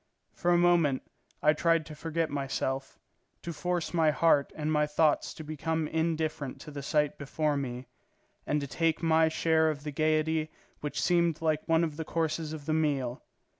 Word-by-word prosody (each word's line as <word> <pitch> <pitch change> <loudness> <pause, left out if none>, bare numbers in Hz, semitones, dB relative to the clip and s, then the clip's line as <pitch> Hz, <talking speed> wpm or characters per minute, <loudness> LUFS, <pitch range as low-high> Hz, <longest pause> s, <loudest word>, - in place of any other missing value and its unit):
For 175 - -1
a 175 - +5
moment 175 -6 +3 0.4
I 150 - +6
tried 165 0 +2
to 155 - -9
forget 165 +1 -2
myself, 135 -1 -3 0.5
to 170 - -4
force 175 +1 -2
my 165 -2 +4
heart 150 -1 +3
and 155 0 -2
my 150 0 +2
thoughts 150 0 +2
to 160 - -8
become 155 +1 -2
indifferent 160 -4 -2
to 150 - -9
the 145 -1 -6
sight 150 0 0
before 150 +1 -1
me, 130 -2 -4 0.6
and 150 - +1
to - - -3
take 165 +3 0
my 160 0 +4
share 160 0 +2
of 145 -2 -4
that 150 - -4
gaiety 155 +1 +1 0.3
which 150 - -4
seemed 170 -3 +2
like 155 -1 0
one 165 0 +3
of 155 -3 -3
the 160 - -3
courses 160 -1 -2
of 155 -2 -7
the 155 - 0
meal. 140 -6 0
155 Hz, 180 wpm, -29 LUFS, 150-165 Hz, 0.6 s, I